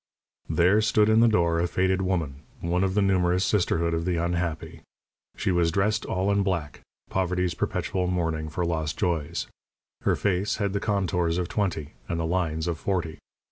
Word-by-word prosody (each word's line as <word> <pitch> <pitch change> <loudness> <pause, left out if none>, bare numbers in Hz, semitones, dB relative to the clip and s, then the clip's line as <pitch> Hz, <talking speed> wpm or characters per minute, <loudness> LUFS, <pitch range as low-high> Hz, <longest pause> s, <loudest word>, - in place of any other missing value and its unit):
There 90 +6 +4
stood 110 0 +3
in 110 +1 +5
the 120 - +6
door 85 -6 +2
a 85 - +1
faded 95 +1 +1
woman, 85 -7 -1 0.2
one 90 +2 0
of 95 0 0
the 105 - +3
numerous 90 -1 +2
sisterhood 85 -4 +1
of 85 0 -1
the 90 0 0
unhappy. 85 -2 -2 0.6
She - - 0
was 85 -2 +2
dressed 105 +4 0
all 95 +2 0
in 100 0 +2
black 85 -7 -2 0.3
poverty's 90 -2 0
perpetual 90 -1 -1
mourning 80 -3 -1
for 85 +3 -2
lost 80 -3 -2
joys. 85 -6 -1 0.6
Her - - +2
face 100 +1 0
had 100 -2 -1
the 100 - 0
contours 90 -5 0
of 90 -2 -2
twenty 85 -8 -2 0.2
and 85 - -1
the 80 - -1
lines 80 -2 -1
of 85 -2 -2
forty. 85 -5 -2
90 Hz, 180 wpm, -26 LUFS, 85-95 Hz, 0.6 s, the